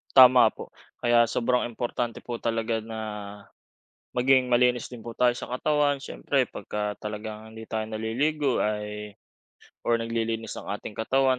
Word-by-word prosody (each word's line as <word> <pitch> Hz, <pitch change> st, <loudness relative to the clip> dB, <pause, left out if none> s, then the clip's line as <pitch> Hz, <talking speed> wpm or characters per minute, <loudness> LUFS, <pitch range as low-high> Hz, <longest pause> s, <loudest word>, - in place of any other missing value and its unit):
Tama 125 Hz, -3 st, +9 dB
po. -, -, -9 dB, 0.3 s
Kaya 120 Hz, -1 st, +5 dB
sobrang 125 Hz, +1 st, +1 dB
importante 120 Hz, 0 st, -3 dB
po 120 Hz, -1 st, -4 dB
talaga 115 Hz, 0 st, 0 dB
na, 110 Hz, 0 st, -6 dB, 1.2 s
maging 130 Hz, 0 st, +4 dB
malinis 125 Hz, 0 st, +3 dB
din 120 Hz, -3 st, -10 dB
po 115 Hz, -, -6 dB
tayo 120 Hz, +1 st, +2 dB
sa -, -, -5 dB
katawan. 145 Hz, +1 st, +2 dB
Siyempre -, -, -1 dB
pagka 105 Hz, 0 st, -4 dB
talagang 110 Hz, +1 st, -7 dB
hindi 110 Hz, 0 st, -10 dB
tayo 110 Hz, -1 st, -1 dB
naliligo 125 Hz, +6 st, 0 dB
ay 105 Hz, 0 st, -3 dB, 0.7 s
or 115 Hz, -1 st, +3 dB
naglilinis 115 Hz, -1 st, -2 dB
ng -, -, -9 dB
ating 105 Hz, +1 st, -5 dB
katawan 130 Hz, +3 st, +2 dB
115 Hz, 140 wpm, -27 LUFS, 110-125 Hz, 1.2 s, Tama